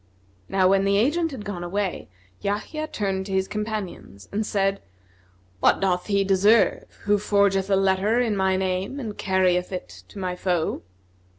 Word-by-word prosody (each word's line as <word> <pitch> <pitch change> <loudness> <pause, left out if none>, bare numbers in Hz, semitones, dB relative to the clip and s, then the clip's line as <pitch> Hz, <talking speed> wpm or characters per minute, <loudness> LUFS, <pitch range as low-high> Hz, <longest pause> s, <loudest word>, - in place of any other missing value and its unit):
Now 190 -1 +3
when 195 +1 +3
the 200 0 +2
agent 315 +10 +2
had 260 -8 -8
gone 185 -4 -5
away, 190 - -3 0.3
Yahya 260 +10 -3
turned 195 -6 -2
to 195 - -4
his 190 0 +1
companions 210 - -5
and 210 +2 -1
said, 195 -2 0 0.8
"What - - +4
doth 180 -2 0
he 200 -1 +2
deserve 200 +3 +3 0.2
who 205 0 +2
forgeth 200 -1 +2
a 195 - +4
letter 195 +4 +2
in 230 -4 +1
my 190 -1 +2
name 190 +7 -2
and 220 -6 -5
carrieth 185 -1 +1
it 185 - -7
to - - -14
my 185 -2 -3
foe?" 180 -3 -1
195 Hz, 165 wpm, -24 LUFS, 190-210 Hz, 0.8 s, What